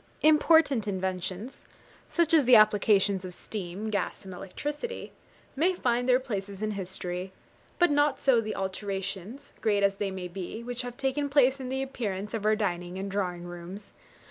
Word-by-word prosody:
Important 305 -6 +5
inventions, 190 +3 -3 0.5
such 340 -2 +1
as 305 -5 +6
the 250 0 +8
applications 205 -2 +4
of 180 -1 -7
steam, 205 +1 -5
gas, 200 -1 -2
and 190 - -7
electricity, 295 - -5 0.4
may 350 +6 +2
find 245 -4 0
their 250 0 +6
places 200 -5 -5
in 215 - 0
history; 185 -1 -4 0.5
but 350 -3 +4
not 290 -1 +3
so 255 -4 +4
the 215 -1 -4
alterations, 195 +5 -4
great 205 -2 +2
as 195 0 +2
they 200 -1 -1
may 190 -1 -5
be, 190 +5 -6
which 245 +1 -3
have 245 -1 -7
taken 280 +2 -1
place 275 -1 +4
in 255 -1 -5
the 265 +1 -1
appearance 210 -6 -4
of 220 -2 -3
our 215 0 +4
dining 180 -3 -2
and 195 +1 -4
drawing 180 -3 -2
rooms. 175 +3 -9
210 Hz, 170 wpm, -28 LUFS, 190-260 Hz, 0.5 s, the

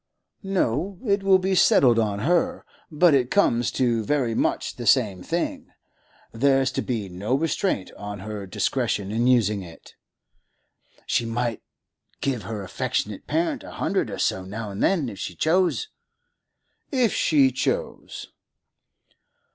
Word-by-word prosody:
'No; 190 - -1
it 200 -2 +2
will 195 -1 +5
be 190 +1 -1
settled 125 -9 +5
on 105 -2 -1
her. 215 - +1 0.2
But 165 +1 +4
it 130 -3 +2
comes 120 -12 +2
to 120 -3 +1
very 125 -1 0
much - - -1
the 120 -2 -5
same 105 -9 +3
thing; 170 - -3 0.6
there's 135 +2 +2
to - - -2
be 115 -5 -3
no 95 +7 -2
restraint 160 - -1
on 105 -1 -7
her 105 -1 -6
discretion 105 -1 -1
in 115 +3 +1
using 105 -5 +3
it.' 85 -3 -13 1.1
'She 115 - 0
might 115 -1 -2 0.6
give 130 -5 -1
her 105 +1 -5
affectionate 100 +2 -3
parent 165 +3 -1
a - - -10
hundred - - -1
or - - -5
so 95 - 0
now 105 +3 -6
and 100 - -6
then, 165 -9 +2
if 105 -4 -8
she 90 - -5
chose?' 185 - +1 1.0
'If 250 -6 +2
she 140 -4 +3
chose. 485 - -3
125 Hz, 140 wpm, -24 LUFS, 105-165 Hz, 1.1 s, will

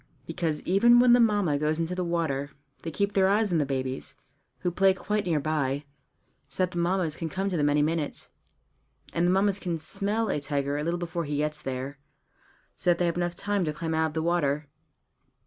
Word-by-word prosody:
Because 160 -1 -2
even 235 +6 +5
when 245 0 +6
the 245 - +6
Mammas 205 -10 +3
go 150 - 0
into 165 +3 0
the 180 0 -2
water 160 -5 -1 0.3
they 165 - -4
keep 200 +5 -1
their 190 -1 +4
eyes 210 0 +2
on 170 - +2
the 145 - 0
babies, 130 -1 -3 0.5
who 180 - 0
play 190 +2 +4
quite 210 0 -2
near 160 -3 +2
by, 145 -1 -1 0.6
so 185 - -1
that 180 - -1
the 175 - -3
Mammas 170 -2 0
can 165 -1 -4
come 190 +4 -2
to - - -1
them 145 -1 +2
any 145 0 +3
minute. 155 -1 -2 0.8
And 170 +1 +2
the - - +3
Mammas 195 +1 +2
can 175 -4 -2
smell 205 +7 -1
a - - 0
tiger 140 -1 -1
a 150 - -2
little 170 +2 0
before 170 -1 -3
he 145 0 -2
gets 150 +1 -1
there, 135 +2 -5 0.8
so - - -1
that 175 - +4
they 175 - +1
have 170 - 0
enough 175 0 -1
time 205 +1 -1
to 155 -2 -1
climb 160 +1 -3
out 160 0 +2
of 155 - -7
the 160 - 0
water. 150 -4 +1
170 Hz, 215 wpm, -27 LUFS, 150-190 Hz, 0.8 s, when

